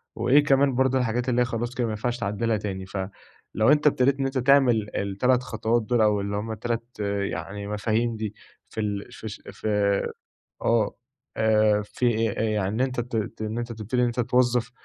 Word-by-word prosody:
وإيه 140 +4 +4
كمان 135 -1 +3
برضو 130 +1 +2
الحاجات 125 0 0
اللي 125 0 +2
هي - - +3
خلاص 120 +1 -3
كده 125 - 0
ما - - -2
ينفعش 120 +3 -2
تعدلها 110 +1 0
تاني، 95 -2 -5
ف 95 - -7 0.6
لو 110 +5 +4
أنت 150 0 +4
أبتديت 135 -1 +3
إن 135 - 0
أنت 135 0 -2
تعمل 125 -5 +4
ال3 120 +6 +1
خطوات 115 -1 0
دول 120 +1 +1
أو 105 -1 +3
اللي 100 +1 -3
هم 110 +2 -3
3 115 +2 -4
يعني 100 0 -3
مفاهيم 110 +3 0
دي 110 -1 -4 0.3
في 110 - -4
ال 100 -1 -3
فش 110 -2 -8
ف - - -13 1.0
آه، 115 -3 +2 0.4
آآ، 110 -1 +3
في 120 +3 0 0.2
يعني 110 +2 0
أنت 130 -2 -2
ت 115 -3 -4
إن 110 +1 -3
أنت 120 0 -4
تبتدي 115 +3 -2
إن - - +4
أنت 120 +1 -1
توظف 125 0 +2
115 Hz, 180 wpm, -25 LUFS, 105-125 Hz, 1.0 s, وإيه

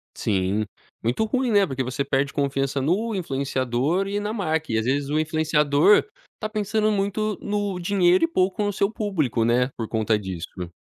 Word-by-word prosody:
Sim, 100 +1 0 0.4
muito 120 - +1
ruim, 255 +2 0
né, 205 -2 +5
porque 135 -2 -2
você 130 +3 -2
perde 140 0 0
confiança 140 -1 0
no 200 +11 0
influenciador 135 +1 -1
e 200 +1 -1
na 210 +1 -3
marca 160 - -1
e 110 - +1
às 110 - 0
vezes 140 +2 0
o 150 +1 +1
influenciador 155 +2 +3 0.3
está 215 - -5
pensando 215 0 0
muito 205 0 -1
no 205 -2 -2
dinheiro 180 - +3
e 330 - +5
pouco 195 - 0
no 205 0 -1
seu 200 +1 +1
público, 155 - 0
né, 125 +2 +2
por 115 - -3
conta 110 -1 +1
disso. 90 -2 -6
155 Hz, 175 wpm, -24 LUFS, 130-205 Hz, 0.4 s, né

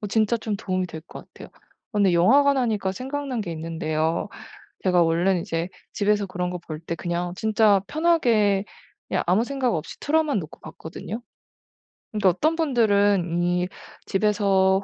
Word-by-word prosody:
어 210 - -4
진짜 220 +2 +2
좀 215 -2 -3
도움이 185 -1 -2
될 160 -2 -8
것 165 - -11
같아요. - - -11 0.4
근데 200 -3 +3
영화관 275 +11 +5
하니까 215 -7 0
생각난 265 +1 -4
게 175 -5 -4
있는데요. 160 +2 -2 0.6
제가 180 -2 +4
원래는 170 +2 +2
이제 165 +1 -3 0.2
집에서 205 -1 +1
그런 180 -1 -3
거 180 - -4
볼 155 -2 -7
때 170 0 -4
그냥 175 +1 -3
진짜 215 -1 +3
편하게 235 - +2 0.4
그냥 - - 0
아무 190 +6 +3
생각 260 -3 -1
없이 155 - -5
틀어만 305 -3 +1
놓고 155 -5 -8
봤거든요. 190 +7 -8 0.9
근데 210 -3 +1
어떤 305 - +1
분들은 205 - +2
이 180 +1 +1 0.4
집에서 195 -2 +2
195 Hz, 315 characters per minute, -24 LUFS, 175-225 Hz, 0.9 s, 영화관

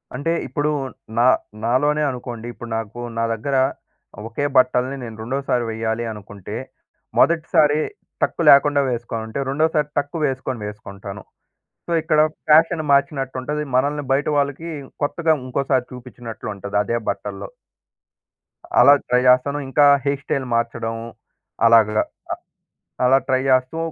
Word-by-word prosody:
అంటే 145 +5 -1 0.2
ఇప్పుడు 150 0 -1 0.5
నా 120 - +5 0.4
నాలోనే 145 +5 +2
అనుకోండి. 120 -2 -7
ఇప్పుడు 120 - -9
నాకు 115 +1 -6 0.2
నా 115 - +1
దగ్గర 125 +5 -2 0.7
ఒకే 115 +5 -3
బట్టల్ని 130 +1 +3
నేను 115 -2 -7
రెండోసారి 125 0 -1
వేయ్యాలి 110 +1 -2
అనుకుంటే 105 -2 -9 0.6
మొదటిసారి 155 -2 +3 0.4
టక్కు - - 0
లేకుండా 140 0 +5
వేసుకొనుంటే, 115 0 -4
రెండోసారి 150 +1 +1
టక్కు 145 +3 -1
వేసుకొని 130 -3 -3
వేసుకుంటాను. 100 -1 -9 0.6
సో - - -5
ఇక్కడ 155 -1 +2 0.3
ఫ్యాషన్ 160 +1 +5
మార్చినట్టు 140 -1 +1
ఉంటది. 150 +3 -3
మనల్ని 145 +3 +1
బయట 135 +2 +2
వాళ్ళకి 145 +4 -1 0.3
కొత్తగా 160 +2 +1
ఇంకోసారి 130 0 0
చూపించినట్లు 125 -2 -9
ఉంటది 100 +1 -4
అదే 115 +4 -1
బట్టల్లో. - - -4 1.3
అలా 140 - +9
ట్రై 125 0 +3
చేస్తాను. 140 +3 +3
ఇంకా 145 +2 +4 0.2
హెయిర్ 140 -1 0
స్టైల్ 135 -1 -2
మార్చడం 115 -1 -1 0.7
అలాగ 115 -2 +6 0.2
అ - - -12 1.0
అలా 130 +2 +5
ట్రై 130 -1 +2
చేస్తూ 130 +4 +2
130 Hz, 125 wpm, -21 LUFS, 115-145 Hz, 1.3 s, అలా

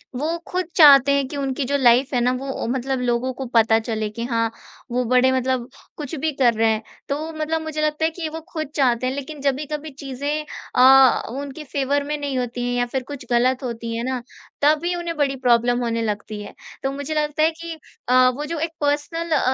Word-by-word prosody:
वो 315 +6 -1
खुद 365 -1 -2
चाहते 280 -4 +8
हैं 275 -2 0
कि 285 - -6
उनकी 270 -1 -2
जो 285 +2 +1
लाइफ़ 255 +2 +4
है 245 - +2
ना, 250 +1 +3
वो 265 +1 -4
मतलब 265 +1 -1
लोगों 245 +1 0
को 265 +1 -6
पता 225 -1 +5
चले 220 -1 -3
कि 230 +2 -6
हाँ, 230 -1 +1 0.4
वो 250 +1 +1
बड़े 255 +2 +4
मतलब 260 -1 -1 0.3
कुछ 300 0 -5
भी 310 +2 -1
कर 240 -2 +5
रहे 225 0 +2
हैं। 220 0 -1 0.3
तो 310 +3 -2
मतलब 315 +1 -2
मुझे 310 -1 -4
लगता 305 +1 +1
है 325 - +1
कि 320 -1 -5
वो 320 +1 -7
खुद 310 -3 -3
चाहते 255 -2 +2
हैं, 260 - -1
लेकिन 285 +1 -6
जभी 280 +1 0
कभी 300 +1 -4
चीज़ें 285 +3 -3 0.3
अ, 265 0 +7
उनके 280 +4 -6
फ़ेवर 280 0 -1
में 300 +1 -3
नहीं 285 -2 -3
होती 245 0 -3
हैं 245 - -1
या 245 - +2
फिर 255 +1 -3
कुछ 285 -4 -8
गलत 255 +3 +2
होती 230 -1 -4
हैं 235 - -3
ना, 255 -1 -2 0.4
तभी 310 +4 +3
उन्हें 340 -1 -4
बड़ी 275 -2 +1
प्रॉब्लम 240 +1 +3
होने 230 -1 -1
लगती 210 -1 -3
है। - - -10 0.3
तो 270 - 0
मुझे 285 +2 -4
लगता 300 0 0
है 320 - +5
कि 335 -1 -5 0.4
अ, 255 0 +6
वो 290 +4 -4
जो 330 0 -4
एक 325 +1 -2
पर्सनल 300 +3 -1
अ 310 - +4
270 Hz, 220 wpm, -22 LUFS, 245-300 Hz, 0.4 s, चाहते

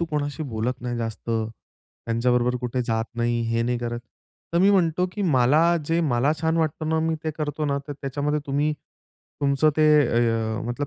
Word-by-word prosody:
"तू 170 - +1
कोणाशी 150 +1 -2
बोलत 120 +4 -2
नाही 120 -1 -3
जास्त, 115 0 -4
त्यांच्याबरोबर 115 +2 -2
कुठे 125 +1 -2
जात 115 -1 -1
नाही, 120 0 0
हे 115 0 +1
नाही 120 0 0
करत." 120 0 -3 0.5
तर 170 - +2
मी 195 +3 +5
म्हणतो, 180 -2 +2
की 205 - -3
"मला 155 +3 +4
जे 165 +1 +1
मला 140 -2 +2
छान 160 0 +1
वाटतं 155 -1 -1
ना, 160 0 +1
मी 160 0 0
ते 155 - 0
करतो 150 0 -2
ना, 140 0 0
तर 145 - -3
त्याच्यामध्ये 145 +2 -1
तुम्ही 145 +2 +1 0.7
तुमचं 140 +2 +3
ते 155 - +3 0.2
ए 120 -1 +2
अ, 110 -1 -1
मतलब 135 +4 -3
140 Hz, 190 wpm, -24 LUFS, 120-155 Hz, 0.7 s, मी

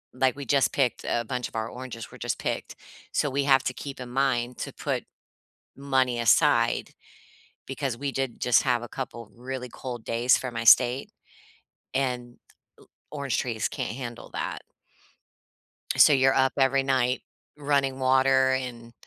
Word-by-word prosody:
like, 130 0 +2
we 140 -1 -7
just 135 +2 +2
picked 130 -4 0
a 120 0 0
bunch 125 +1 -3
of - - -17
our 110 0 -2
oranges 125 -2 -8
were - - -13
just - - -2
picked. - - -3 0.4
So, 145 - +1
we 140 +1 0
have 135 -2 +5
to 125 - -1
keep 140 +1 -8
in 125 -1 -7
mind 125 -2 0
to - - -4
put - - -3 0.7
money 130 -3 0
aside, 115 -2 +3 0.8
because 135 -3 -3
we 140 +1 -3
did 135 -3 -3
just 125 - +4
have 125 -3 +1
a - - -6
couple 120 -4 -7
really 125 +1 -6
cold 120 -2 -7
days 120 +2 +3
for 130 - -4
my 115 -1 -4
state, 125 +4 +5 0.8
and 125 -2 -2 0.8
l 150 - -6
orange 140 -2 -1
trees 115 -3 -1
can't - - -4
handle 120 -3 -7
that. - - -4 1.4
So, 150 - +8
you're 135 -1 +4
up 130 0 +2
every 135 0 +3
night 130 -2 +1 0.4
running 140 -2 0
water, 130 0 +4
and 120 -3 -4
130 Hz, 160 wpm, -26 LUFS, 120-135 Hz, 1.4 s, So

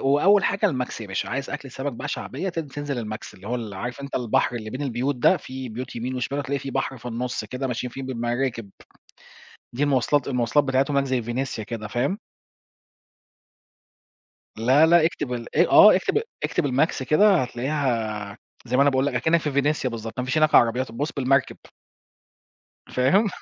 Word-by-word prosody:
وأول 200 +6 +5
حاجة 200 +2 +1
الماكس 125 - -2
يا 105 - -7
باشا. 95 - -3
عايز 140 0 -3
أكلة 145 -3 -6
سمك 135 0 -4
بقى 145 +5 -6
شعبية 190 +5 -4
تن-تنزل 145 -4 -4
الماكس 110 -2 -6
اللي 95 +2 -12
هو 125 - -1
ال 110 -4 -5
عارف 120 +7 -5
أنت 140 - -6
البحر 120 0 +1
اللي 110 -2 -5
بين 130 +5 -5
البيوت 135 +1 -1
ده، 120 - +4
فيه 130 -1 -7
بيوت 125 +3 -7
يمين 125 +3 -3
وشمال 130 +3 -2
وهتلاقي 140 0 -2
فيه 135 - -6
بحر 135 - -2
في 120 - -16
النص 120 -1 -3
كده 130 +5 -4
ماشيين 125 0 -3
فيه 135 - -7
بالمراكب. 120 -3 -2 1.1
دي 135 - -2
المواصلات، 140 0 +2
المواصلات 125 +3 +2
بتاعتهم 135 +2 +1
هناك 140 -1 +1
زي 130 -2 0
فينيسيا 120 -1 -3
كده، 110 -2 -6
فاهم؟ 130 - -1 2.4
لا، 130 +7 +5
لأ 165 -1 +5
اكتب 135 -6 -2
ال 120 -1 -7
آآ، - - +4
آه - - +9
اكتب، 435 - +1 0.2
اكتب 175 - 0
الماكس 135 +1 +1
كده 195 +9 +5
هتلاقيها 120 -6 -2 0.3
زي 125 - -1
ما - - +5
أنا 145 - +5
باقول 135 0 +1
لك 145 - -1
أكنك 160 +7 +2
في 150 - -2
فينيسيا 140 -1 +1
بالضبط، 115 0 -6
ما 125 - -1
فيش 130 +4 -1
هناك 155 0 +4
عربيات، 125 +2 +3
بُص 145 +7 -3
بالمركب. 135 0 +1 1.3
فاهم؟ 185 - +3
130 Hz, 180 wpm, -24 LUFS, 120-145 Hz, 2.4 s, آه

